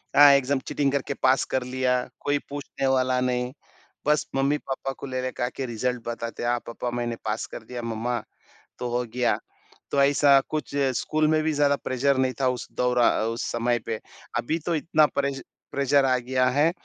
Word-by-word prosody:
हाँ, 145 0 +9
exam 140 0 +2
cheating 140 -2 +1
करके 140 0 -1
पास 130 +1 +4
कर 130 - +1
लिया, 125 0 0 0.2
कोई 145 0 +1
पूछने 140 -1 -3
वाला 130 -1 +2
नहीं। 125 0 0 0.5
बस 150 0 +2
मम्मी-पापा 135 -1 -1
को - - -6
लेले 130 0 -2
का 125 - -2
के 135 +1 -5
रिज़ल्ट 120 0 -2
बताते 115 0 -4
हैं, 120 - +1
हाँ 120 0 +1
पापा 120 +1 -4
मैंने 120 -1 -2
पास 110 +1 -1
कर - - -9
दिया 120 +2 -6
मम्मा, 115 +1 -2 0.6
तो 125 - -2
हो 125 - 0
गया। 125 0 +2 0.5
तो 140 - +3
ऐसा 140 0 +5
कुछ 150 -2 -3 0.2
स्कूल 155 0 +1
में 155 0 +3
भी 160 - +1
ज़्यादा 145 -1 +3
प्रेशर 130 +1 +1
नहीं 130 -1 +1
था 130 - +3
उस 125 -1 -4
दोरा 125 -1 +3 0.2
उस 115 +1 -3
समय 120 0 +1
पे। 110 -1 -2 0.4
अभी 160 +7 0
तो 170 - +1
इतना 155 0 +3
प्रेश 140 -1 -1 0.3
प्रेशर 140 0 +3
आ 130 -1 +3
गया 130 +1 0
है 145 +5 +3
130 Hz, 190 wpm, -25 LUFS, 125-140 Hz, 0.6 s, हाँ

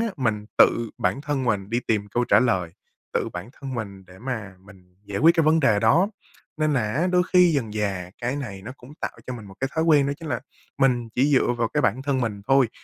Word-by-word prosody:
á, 230 - +1
mình 110 -6 -1
tự 115 -1 +4
bản 95 +8 0
thân 140 -2 -2
mình 105 -4 -1
đi 120 +2 0
tìm 105 -3 -1
câu 120 +4 0
trả - - +5
lời, 95 -9 +1 0.4
tự - - 0
bản 90 +5 -6
thân 135 -2 -7
mình 100 -4 -6
để 90 +1 -15
mà 110 -6 -5
mình 95 -2 -19
giải 100 -1 -4
quyết 165 +2 +6
cái 165 -2 +2
vấn 160 +1 +4
đề 115 -7 +3
đó. 165 - +4 0.5
Nên 155 -1 +1
là 110 -5 0
á, 165 +6 +1
đôi 180 0 +3
khi 180 -2 +6
dần 115 -8 -1
dà 95 -4 -2
cái 125 +4 -2
này 100 -9 -6
nó 130 - -7
cũng 130 +3 -14
tạo - - -4
cho 125 - -4
mình 115 -3 -9
một 95 - -12
cái 135 - 0
thói 160 - +1
quen, 150 -4 +4
đó 140 - 0
chính 165 - -7
là 120 -3 -2 0.4
mình 125 -3 +2
chỉ 135 +4 +2
dựa 130 -2 +3
vào 120 -2 -1
cái - - 0
bản 120 +2 +1
thân 135 -2 0
mình 105 -4 -3
thôi. 135 -3 +5
120 Hz, 255 wpm, -24 LUFS, 105-140 Hz, 0.5 s, quyết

